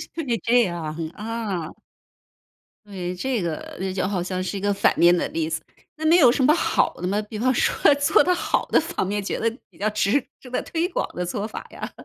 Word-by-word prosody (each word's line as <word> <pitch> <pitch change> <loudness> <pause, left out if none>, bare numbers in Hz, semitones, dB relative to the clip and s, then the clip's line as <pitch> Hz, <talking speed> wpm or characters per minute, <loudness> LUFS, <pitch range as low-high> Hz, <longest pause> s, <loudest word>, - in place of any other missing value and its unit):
是 330 - -3 0.2
这 245 +1 +4
样， 170 -5 -3 0.2
啊。 210 -7 -4 1.1
对， 185 -3 -5
这 250 +3 -1
个 165 -3 -4
那 190 0 -2
就 185 0 -1
好 190 -2 -1
像 185 +1 -3
是 185 - -4
一 - - -5
个 205 +1 +1
反 195 - +3
面 175 +1 +6
的 175 - 0
例 160 -1 -2
子。 160 0 -2 0.4
那 315 - -4
没 330 +2 +6
有 260 -9 +7
什 260 - +1
么 300 - +6
好 335 - +1
的 180 - -4
吗？ 200 +3 0
比 210 0 -7
方 255 +3 +3
说 260 - +3
做 285 0 +4
得 360 - +3
好 - - 0
的 - - +4
方 315 -10 -2
面 205 +1 -2
觉 - - -3
得 230 - +2 0.2
比 - - -22
较 210 +2 +1
值 215 +5 +1 0.2
值 250 - -13
得 250 - 0
推 335 +1 -1
广 - - -2
的 180 - -2
做 200 +4 -3
法 220 - -7
呀？ - - -6
205 Hz, 245 characters per minute, -23 LUFS, 180-250 Hz, 1.1 s, 有